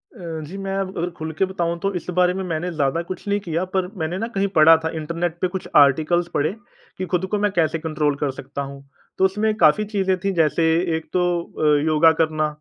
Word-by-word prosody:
अ, - - -14 0.3
जी। 190 - -8
मैं 195 0 -4
अब 190 0 -4
अगर 175 +1 -1
ख़ुल 160 0 -4
के 190 - +4
बताऊँ 170 -3 -2
तो 195 +2 -1
इस 180 - -5
बारे 180 0 +4
में 190 +1 -3
मैंने 175 0 -3
ज़्यादा 150 0 0
कुछ 185 +2 -7
नहीं 205 0 +1
किया 170 -3 -2
पर 185 -1 +1
मैंने 160 +3 -2
ना 225 - -2
कहीं 195 +1 +1
पढ़ा 160 +1 +8
था 160 - 0
इंटरनेट 170 +2 -3
पे 185 - +2
कुछ 190 +1 -6
आर्टिकल्स 155 +5 +4
पढ़े 150 +3 +1 0.5
कि 185 - -3
ख़ुद 180 +1 +1
को 210 - +1
मैं 205 0 +1
कैसे 165 -3 +1
कंट्रोल 155 -2 -1
कर 145 -2 0
सकता 135 +2 -7
हूँ। 140 0 -8 0.3
तो 190 - +4
उसमें 210 +3 +1
काफ़ी 185 +1 +4
चीज़ें 190 -3 0
थीं, 195 +1 -1
जैसे 165 -2 +2 0.3
1 160 - -10
तो 180 -1 +2 0.2
अ, 150 -3 +1
योगा 160 +1 +5
करना, 155 -1 +1
170 Hz, 230 wpm, -22 LUFS, 155-190 Hz, 0.5 s, पढ़ा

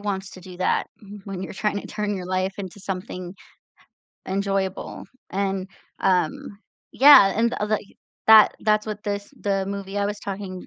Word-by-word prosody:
wants 195 -2 -3
to 185 - -12
do 180 0 -11
that 185 - +1 0.4
when 195 -2 -6
you're - - -6
tryna 205 +1 -2
turn 210 -1 -2
your 185 - -5
life 185 +1 -1
into 195 0 -7
something 185 -1 -6 0.9
enjoyable, 195 0 -2 0.3
and, 195 0 -2 0.3
um 185 +1 0 0.3
yeah, 265 -8 +8
and 235 +2 +2
l 210 - -1
like, 215 -1 0 0.4
that 220 -1 +8
that's 215 0 +2
what 210 -1 -5
this 205 0 -4
the 195 -1 0
movie 200 0 -5
I 200 - +1
was 205 0 -4
talking 195 -2 -6
195 Hz, 160 wpm, -23 LUFS, 190-205 Hz, 0.9 s, yeah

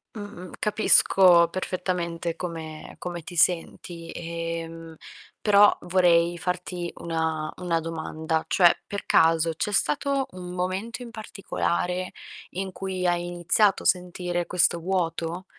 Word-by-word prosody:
Mh-mh. 205 -4 -9
Capisco 185 -5 +6
perfettamente 175 -2 -3
come 160 -3 -7
come 175 -1 -6
ti 175 - -10
senti. 170 0 0
E, 165 0 -4
emhmm, 165 0 -10 0.5
però 205 -1 +6
vorrei 175 -1 +3
farti 180 0 -4
una 160 -2 -2
una 170 -2 -1
domanda, 160 0 -3
cioè, 175 -3 +5
per 200 - -5
caso 165 0 +3
c'è 175 +6 -2
stato 270 - 0
un 180 -1 -8
momento 190 +7 -3
in 235 - -9
particolare 185 -4 -3 0.4
in 190 +1 -4
cui 185 -1 -4
hai 175 0 +1
iniziato 175 +4 +2
a - - -13
sentire 180 -1 0
questo 175 -1 +2
vuoto? 170 0 -2
175 Hz, 125 wpm, -25 LUFS, 165-185 Hz, 0.5 s, Capisco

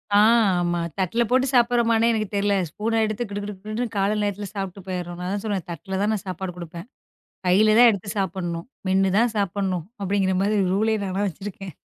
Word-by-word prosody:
அ - - +7 0.4
ஆமா. 175 -1 0 0.2
தட்ல 190 +5 +1
போட்டுச் 260 +1 +2
சாப்பிறமான்னு 235 -2 +3
எனக்குத் 215 -3 -2
தெரியல. 200 0 +2
ஸ்பூன் 220 +7 -2
எடுத்துக் 215 +1 -3
கிடு 205 0 -4
கிடு 205 0 -5
கிடுன்னு 220 +3 -3
காலை 200 +1 +2
நேரத்துல 205 0 -2
சாப்பிட்டு 195 -1 -5
போயிருறோம். 175 -2 -4
நான் 180 +1 -3
தான் 205 - -3
சொல்றேன் 200 -5 -2
தட்டில் 190 +4 -4
தான் 210 +2 +2
நான் 205 -3 -4
சாப்பாடு 185 0 -4
குடுப்பேன். 170 +2 -8 0.6
கையில 210 +4 +5
தான் 245 0 +9
எடுத்துச் 200 -1 -4
சாப்பிடணும். 175 -3 -3 0.2
மென்னு 190 0 +3
தான் 235 0 +3
சாப்பிடணும் 190 -3 -1 0.2
அப்டிங்கிற 195 -1 +1
மாதிரி 210 +1 +1 0.2
ரூல் 215 +3 +2
-ஏ - - +1
நானா 190 +1 -2
வச்சிருக்கேன். 195 +1 -8
200 Hz, 185 wpm, -24 LUFS, 185-215 Hz, 0.6 s, தான்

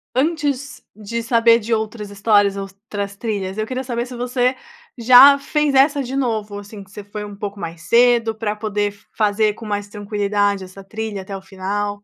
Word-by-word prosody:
antes 285 -2 -1
de 220 +2 -5
saber 230 0 +4
de 230 +2 -2
outras 220 -1 -3
histórias, 205 -1 +2
outras 200 +1 -6
trilhas, 200 -3 -3
eu 215 - -1
queria 255 +2 -4
saber 240 -2 -3
se 250 0 -9
você 250 +1 0 0.4
já 255 +4 +8
fez 300 0 0
essa 280 +1 +4
de 260 +2 -5
novo? 215 -6 -2
Assim, 205 0 -10
que 190 - -21
você 210 -1 -9
foi 210 +1 -7
pouco 205 -1 -6
mais 165 -1 -6
cedo 235 +2 +3
para 215 -1 -2
poder 210 -1 -1 0.2
fazer 210 0 +2
com 225 - -11
mais 205 -1 -3
tranquilidade 205 -1 -1
essa 190 +2 -12
trilha 215 0 -5
até 195 +1 -7
o - - -11
final? 205 +2 -4
215 Hz, 180 wpm, -20 LUFS, 205-240 Hz, 0.4 s, já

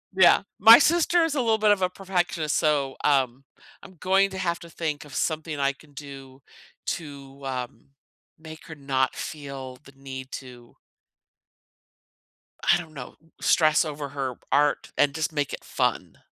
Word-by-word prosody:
Yeah, 185 -2 +6 0.2
my 225 +4 +10
sister 340 +2 +3
is 325 -2 -1
a 275 - +1
little 225 -2 +2
bit 215 0 +3
of 205 -2 +2
a 180 - +2
perfectionist, 175 -5 -2
so, 145 -4 +1
um, 135 -2 +1 0.4
I'm 190 -1 -14
going 195 +1 +3
to 190 - -6
have 170 -2 -1
to 170 - -11
think 155 -3 -4
of 145 - -14
something 155 -2 -2
I 140 0 +2
can 145 +2 -20
do 135 -1 -11 0.5
to, 140 -3 -6
uh, 130 -2 -3 0.7
make 160 0 -11
her 155 - -8
not 135 -2 -1
feel 140 -4 -7
the - - -15
need 130 -1 -9
to 125 -2 -10 1.9
I - - +5
don't 160 -3 -9
know, 130 -4 -9 0.2
stress 155 0 +3
over 145 -2 -5
her 135 -2 -3 0.2
art 145 +1 +1
and 145 -1 +2
just 160 -1 -1
make 145 -2 -2
it - - -7
fun. - - -2
150 Hz, 160 wpm, -25 LUFS, 135-175 Hz, 1.9 s, my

